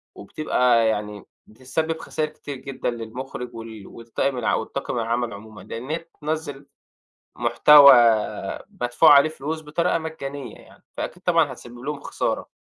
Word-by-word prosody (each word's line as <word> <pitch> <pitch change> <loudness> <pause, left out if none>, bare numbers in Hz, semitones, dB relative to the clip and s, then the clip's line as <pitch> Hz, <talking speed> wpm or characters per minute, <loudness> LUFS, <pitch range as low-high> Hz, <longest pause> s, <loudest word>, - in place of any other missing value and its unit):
وبتبقى 120 -1 +1
يعني 105 -1 -3 0.2
بتسبب 160 +8 -3
خساير 155 0 -3
كتير 145 -2 -9
جدًا 135 0 -4
للمخرج 120 +1 -7
ول 110 -3 -9
ولطاقم 115 +3 -3
الع 120 - +1
ولطاقم 120 +1 -4
العمل 115 0 -1
عمومًا 105 +1 -11
لأن 120 +4 -8
هي 155 - 0
بتنزّل 155 -3 -6 0.7
محتوى 140 +5 +7 0.9
مدفوع 120 +6 +5
عليه 140 +2 +6
فلوس 155 +1 -5
بطريقة 165 +4 0
مجانية 145 -6 -7
يعني، - - -19
فأكيد 180 - -6
طبعًا 165 -6 +2
هتسبب 120 -1 -13
لهم 145 +3 -5
خسارة. - - -3
135 Hz, 135 wpm, -23 LUFS, 115-155 Hz, 0.9 s, محتوى